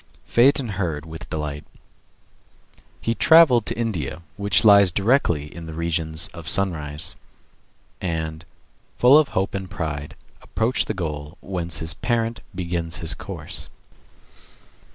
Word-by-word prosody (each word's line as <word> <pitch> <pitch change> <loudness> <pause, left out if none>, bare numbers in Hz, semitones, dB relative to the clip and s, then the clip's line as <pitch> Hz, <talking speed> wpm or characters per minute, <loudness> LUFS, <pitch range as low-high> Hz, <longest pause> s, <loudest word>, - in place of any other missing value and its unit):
Phaeton 130 +1 +4
heard 85 -6 -3
with 80 0 -9
delight. 75 -1 -4 1.4
He 115 - -1
travelled 135 -5 +6
to - - -2
India, 85 - -3
which 100 +1 +3
lies 100 -2 +8
directly 90 - +1
in 85 -1 -8
the 80 - -7
regions 80 -1 -1
of 85 -2 -10
sunrise; 80 -7 0 0.9
and, 80 -3 -3 0.5
full 125 +3 +6
of 155 - +2
hope 95 +1 0
and 95 -2 -4
pride, 75 -4 -5 0.3
approached 115 +3 0
the 110 - -2
goal 75 -3 -5
whence 85 -4 -4
his 80 +2 -2
parent 115 -1 -1
begins 85 -2 -3
his 85 -2 -2
course. - - -8
85 Hz, 125 wpm, -23 LUFS, 80-105 Hz, 1.4 s, lies